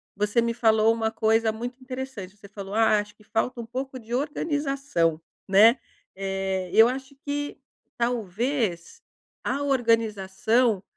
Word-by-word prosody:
você 210 +3 +1
me 235 0 0
falou 220 -1 +4
uma 225 -1 -1
coisa 225 0 +2
muito 245 +4 -6
interessante, 255 -7 -7
você 200 - -14
falou: 200 -1 -8
"Ah, 220 -1 +4
acho 205 0 -7
que 215 - -22
falta 235 +3 -2
um - - -8
pouco 260 +2 -5
de 230 0 -9
organização, 275 - -1 0.3
né". 215 +6 +6 0.4
Eh, 190 -1 -3
eu 225 +2 +7
acho 265 +2 -6
que 290 0 -3 0.4
talvez 235 - -1 0.4
a 280 - -1
organização 230 -3 +1
225 Hz, 135 wpm, -25 LUFS, 205-255 Hz, 0.4 s, eu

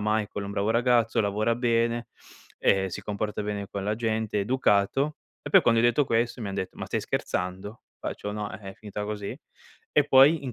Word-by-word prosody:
Michael 105 0 0
è 100 - -4
un - - -5
bravo 100 +2 0
ragazzo, 120 -1 +3
lavora 105 +2 +1
bene, 115 -1 +1 0.5
ehm, 95 -1 +3
si 90 - -6
comporta 105 0 -3
bene 105 -1 -3
con 100 - -5
la 105 +1 0
gente, 110 -2 -1
è - - +2
educato." 130 +4 +1 0.3
E, - - -6
poi 195 - +8
quando 115 -5 +3
hai 120 - +5
detto, 120 +5 +3
questo 120 0 0
mi 105 - -3
han 95 - -4
detto: 95 -2 -4
"Ma - - -4
stai - - -1
scherzando?", 95 +5 -3 0.2
faccio: 105 - -5
"No, 105 -1 -4
eh, - - -7
è 95 - -13
finita 105 -1 -6
così.". 105 -1 -5 0.6
E, 150 - +4
poi 140 +2 +6
in 130 - -4
110 Hz, 210 wpm, -27 LUFS, 100-120 Hz, 0.6 s, poi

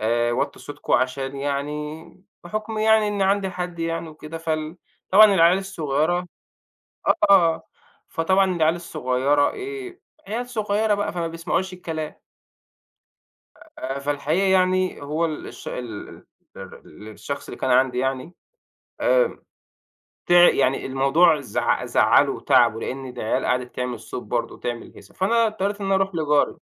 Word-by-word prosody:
آآ 120 +2 +1
وطوا - - -2
صوتكم 145 0 -6
عشان 135 +1 0
يعني 150 +5 -5 0.2
بحُكم 215 +4 -4
يعني 220 0 +4
إن 205 -1 -1
عندي 195 0 +1
حد 180 -1 -5
يعني 165 0 -3
وكده 155 +1 -9
فال 155 0 -3 0.3
طبعًا 210 +3 +9
العيال 175 +1 +5
الصغيرة 175 -2 -1 0.8
آه، - - +5
آه، 170 -5 +5 0.4
فطبعًا 185 +2 +1
العيال 160 0 +2
الصغيرة 145 -3 0
إيه 395 -2 -7 0.3
عيال 240 +4 -4
صغيرة 215 -2 0
بقى 205 -3 -2
فما 170 -1 -2
بيسمعوش 170 +3 -2
الكلام. 160 -4 -5 1.6
آآ 135 +1 -4
فالحقيقة 145 +6 0
يعني 185 -2 +2
هو 150 +4 -1
الش 155 -2 -7
ال 115 -4 -6
ال - - -14 0.3
ال 105 - -12
الشخص 140 +6 -7
اللي - - -9
كان 130 - 0
عندي 125 0 +3
يعني 135 +6 -2 0.7
آآ، - - +2 0.9
تِع 175 0 +7
يعني 135 -1 +1
الموضوع 140 +5 +3
زع 125 -7 -1
زعّلُه - - +4
وتعَبُه 115 +1 +3
لإن 135 0 -5
العيال 125 -3 -2
قعدِت 125 0 -1
تعمل 125 -1 -3
صوت - - -7
برضه - - -3
وتعمل 120 -1 -6
هيصة. - - -16
فأنا 230 +5 +2
اضطريت 205 -1 -2
إن 195 - -3
أنا 195 - +2
أروح 195 0 0
لجَاري. 150 -3 +1
165 Hz, 140 wpm, -23 LUFS, 140-190 Hz, 1.6 s, طبعًا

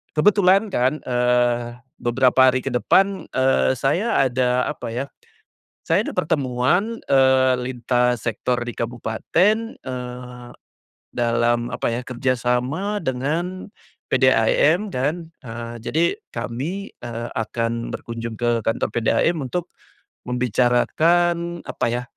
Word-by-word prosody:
kebetulan 195 +4 +4
kan, 130 +5 +1
eee, 120 -1 +1 0.3
beberapa 130 +2 +4
hari 130 0 -1
ke 135 - -3
depan, 195 +10 +2
eee, 130 0 +3
saya 160 - 0
ada 125 0 +1
apa 150 - -7
ya, 120 +4 -3 0.8
saya - - +1
ada - - -4
pertemuan, 155 - 0
eee, 130 -1 +4
lintas 125 -1 0
sektor 125 +2 -1
di 120 0 -6
kabupaten, 120 - +1 0.2
eee, 125 -1 -7 0.7
dalam 120 0 +1
apa - - -2
ya 120 - -2
kerjasama 130 - -1
dengan, 160 +7 -3 0.4
PDAM - - +3
dan, 160 +3 -2 0.2
eee, 115 0 -6
jadi 160 +7 +1 0.3
kami, 165 +12 -4
eee, 120 0 -6
akan 115 +1 -2
berkunjung 115 0 -5
ke 120 -2 +1
kantor 115 - 0
PDAM 140 +8 +1
untuk, 175 +7 -3 0.6
membicarakan 160 +9 +1
apa - - -2
ya, 120 +1 -2
125 Hz, 110 wpm, -22 LUFS, 120-165 Hz, 0.8 s, kebetulan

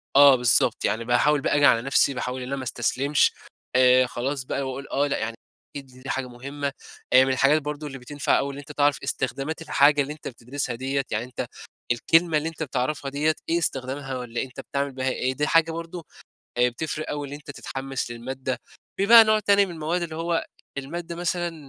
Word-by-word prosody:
اه 140 -1 +9
بالضبط، 120 -2 +3
يعني 115 +1 -1
باحاول 135 +5 +3
بقى - - +1
آجي 145 0 +4
على 115 - +5
نفسي 135 +2 +3
باحاول، 125 0 -4
إن 125 - -6
أنا 140 - -2
ما 135 - -5
أستسلمش، 130 +4 +1 0.4
آآ 130 0 +6
خلاص 130 +3 -3
بقى 140 - -3
باقول 135 +1 -5
آه، 145 +1 +1
لأ 140 - -1
يعني 115 +1 -3 0.4
أكيد 140 - -8 0.2
دي 135 - -7
حاجة 135 -1 -2
مهمة. 140 +4 -5 0.4
آآ 130 +1 +8
من 135 - +1
الحاجات 140 +4 +3
برضه 150 +1 -5
اللي 135 - -7
بتنفع 140 +3 0
أوي، 140 0 -2
إن - - -9
أنت 145 +1 -10
تعرف 145 -1 +2
إستخدامات 135 +4 -3
الحاجة 145 -2 +4
اللي 140 +2 -3
أنت 155 - -10
بتدرسها 125 +1 -4
ديَّة، 135 +3 -1
يعني 110 +2 -1
أنت 125 - -5 0.4
الكلمة 165 +6 +3
اللي 160 +2 -1
إنت 165 0 -6
بتعرفها 140 0 -2
ديَّة 155 +3 +1
إيه 170 - +2
استخدامها، 135 -3 -2
والّا 120 -1 -4
أنت 130 -2 -7
بتعمل 140 0 -3
بها 130 0 -2
ايه، 130 0 -1
دي 150 0 0
حاجة 165 0 +3
برضه 165 +1 -7 0.5
آآ، 125 0 +4
بتفرق 155 +5 -4
أوي 145 -1 -3
إن 140 - -8
أنت 145 0 -8
تتحمس 135 -2 -5
للمادة. 130 +2 -4 0.4
في 195 - +3
بقى 230 +1 +10
نوع 215 0 +3
تاني 200 -1 +4
من 185 - -8
المواد 165 +3 -2
اللي 165 -2 -4
هو 165 +1 -1 0.3
المادة 170 +5 -5
مثلًا 175 0 -2
140 Hz, 205 wpm, -25 LUFS, 130-155 Hz, 0.5 s, بقى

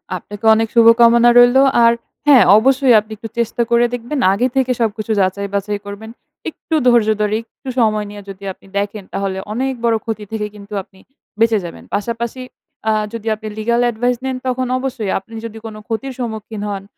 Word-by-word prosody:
আপনাকে 205 +4 -8
অনেক 225 +1 +1
শুভকামনা 235 +1 +6
রইলো। 245 +2 +6 0.2
আর 230 0 +6 0.3
হ্যা 280 -3 +8 0.2
অবশ্যই 260 +2 +4
আপনি 215 +1 -11
একটু 225 +1 -8
চেষ্টা 235 +1 -1
করে 235 0 +4
দেখবেন 245 +4 -3
আগে 240 +6 +1
থেকে 260 -1 +1
সবকিছু 220 -1 -1
যাচাই-বাছাই 200 +2 -2
করবেন। 205 +2 -8 0.4
একটু 320 - -5
ধৈর্য 235 -3 +4
ধরে, 210 0 +1 0.2
একটু 265 - -9
সময় 215 -2 +2
নিয়ে 205 0 -9
যদি 195 0 -10
আপনি 195 - -22
দেখেন, 205 0 -3
তাহলে 195 -1 -2 0.2
অনেক 265 +4 -1
বড় 230 -1 +3
ক্ষতি 220 -2 -4
থেকে 220 -1 -2
কিন্তু 205 0 -12
আপনি 190 - -24 0.4
বেঁচে 230 -1 +3
যাবেন। 170 - -9
পাশাপাশি 235 +4 -3 0.5
আ - - +3 0.2
যদি 225 -1 -7
আপনি 215 0 -9
legal 235 +2 +1
advice 245 +2 -1
নেন, 260 -1 -2
তখন 255 0 -1
অবশ্যই 250 -6 -3
আপনি 210 +4 -18
যদি 225 -1 -8
কোন 220 -1 -7
ক্ষতির 255 +4 -4
সম্মুখীন 220 -3 -5
হন, 195 -1 -4
225 Hz, 175 wpm, -17 LUFS, 210-240 Hz, 0.5 s, হ্যা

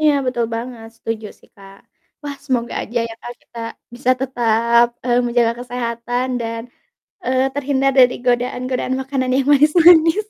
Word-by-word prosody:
Iya, 305 -1 +4
betul 245 -2 0
banget, 230 -1 -6
setuju 225 -1 -5
sih - - -23
Kak. 195 -1 -14 0.5
Wah, 285 -1 -6
semoga 245 -4 -1
aja 240 +2 -3
ya - - -8
Kak, 240 - -7
kita 235 - -13 0.4
bisa 245 +1 0
tetap, 235 -2 +2 0.2
eee, 245 -1 +2
menjaga 235 -1 +2
kesehatan 245 0 -3
dan, 230 0 -4 0.6
eee, 260 +1 +2
terhindar 275 -1 +1
dari 250 -1 +6
godaan-godaan 250 +1 -1
makanan 265 -1 -2
yang 270 0 +1
manis-manis. 325 +5 +5
245 Hz, 145 wpm, -19 LUFS, 235-270 Hz, 0.6 s, dari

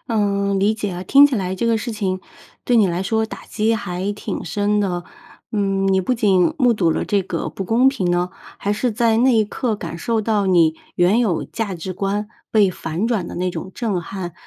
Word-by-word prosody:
嗯， 200 -3 +1
理 210 +2 +3
解 210 -2 -3
啊， 180 0 -5
听 280 +8 +7
起 285 - -2
来 190 -4 -1
这 190 - -3
个 230 -1 +2
事 235 - -4
情 190 -4 -2 0.4
对 245 - +3
你 215 -3 +5
来 175 +1 -1
说 220 +3 0
打 - - -9
击 220 +1 0
还 195 -2 -3
挺 205 - -5
深 205 0 0
的。 180 -4 -1 0.5
嗯， 195 -2 +1
你 190 - +3
不 250 +7 0
仅 205 - +3
目 250 -4 +4
睹 175 -7 +2
了 - - -2
这 200 -1 +1
个 180 -2 -3
不 195 - -6
公 240 +7 +4
平 195 -10 -1
呢， 175 +1 +1 0.3
还 205 - -1
是 225 +3 -1
在 230 0 +2
那 250 +1 +4
一 220 - +4
刻 225 +2 -2
感 170 -4 -6
受 225 +5 0
到 210 -2 0
你 165 -4 +4 0.2
原 180 +5 +3
有 210 -9 +1
价 210 -5 -4
值 180 +2 -5
观 200 +3 -2 0.2
被 205 -4 +4
反 170 +5 -3
转 215 -8 0
的 - - -7
那 180 +1 -1
种 185 +1 -7
震 215 -7 -1
撼， 175 0 -6
200 Hz, 235 characters per minute, -20 LUFS, 185-225 Hz, 0.5 s, 听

